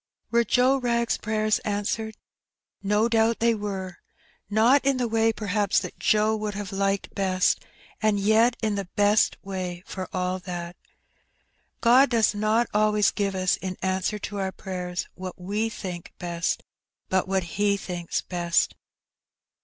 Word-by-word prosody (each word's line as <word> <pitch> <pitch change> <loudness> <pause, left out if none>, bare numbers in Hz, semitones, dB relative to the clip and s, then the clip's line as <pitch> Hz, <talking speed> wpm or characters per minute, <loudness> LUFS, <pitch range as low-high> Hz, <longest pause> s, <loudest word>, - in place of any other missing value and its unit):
Were 235 0 +4
Joe 255 +3 +3
Wrag^s 235 -1 0
prayers 215 0 +1
answered? 210 +1 -2 0.6
No 210 +3 +2
doubt 230 0 +2
they 230 0 +3
were. 195 -4 -4 0.5
Not 230 +7 +4
in 275 -1 +2
the 245 -2 0
way, 225 0 +2
perhaps, 205 -2 0
that - - -8
Joe 215 +1 +3
would 210 -1 -3
have 205 -2 -5
liked 195 0 -1
best, 185 -2 +1 0.4
and 215 -1 +2
yet 220 +4 +4
in 215 -1 +1
the 200 -2 -3
best 205 +1 +3
way 185 -2 -5
for 185 -1 -6
all 185 0 -1
that. 175 -1 -6 1.1
God 255 +4 +6
does 225 -3 +3
not 215 +3 +2
always 210 -1 +3
give 200 -2 -1
us 185 -1 +1
in 185 -1 -5
answer 190 +3 0
to 205 0 -6
our 190 -1 -1
prayers 180 -2 -5
what 185 -1 -8
we 205 +5 -1
think 180 -5 -7
best, 175 0 -2 0.4
but 190 -1 +1
what 190 -1 +1 0.2
He 205 -1 +3
thinks 175 -3 -3
best. 175 -2 +1
205 Hz, 150 wpm, -25 LUFS, 185-220 Hz, 1.1 s, God